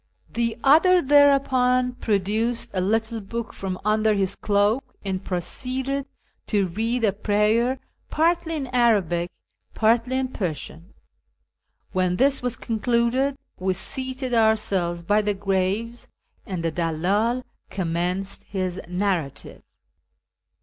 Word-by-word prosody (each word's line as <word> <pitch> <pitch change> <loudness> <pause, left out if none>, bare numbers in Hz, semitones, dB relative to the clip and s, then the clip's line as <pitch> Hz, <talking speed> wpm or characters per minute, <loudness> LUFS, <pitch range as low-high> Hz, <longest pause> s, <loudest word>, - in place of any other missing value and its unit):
The 230 -1 0
other 335 +6 +6
thereupon 265 -4 +4
produced 225 +2 -1
a 185 - 0
little 225 +3 0
book 230 +3 -5
from 190 -1 -4
under 215 0 +3
his 195 -1 0
cloak, 205 +5 +1 0.2
and 190 -1 -2
proceeded 260 +10 -2 0.4
to 205 -3 +2
read 230 +6 -1
a 205 -3 +3
prayer, 215 +5 +1 0.3
partly 330 +1 +1
in 290 -3 -3
Arabic, 195 -8 +2 0.5
partly 235 +3 +2
in 260 -1 -1
Persian. 170 - -6 1.0
When 185 -1 +1
this 270 +5 +2
was 245 -1 -2
concluded, 235 +4 0 0.2
we 185 0 0
seated 260 +4 -4
ourselves 200 -6 +1
by 205 +5 +3
the 205 -1 -1
graves, 195 +4 -1 0.4
and 185 -4 -4
the 165 - 0
dallM 185 +10 0 0.3
commenced 180 +2 -2
his 185 -2 -3
narrative. 180 -5 -2
220 Hz, 115 wpm, -24 LUFS, 190-250 Hz, 1.0 s, other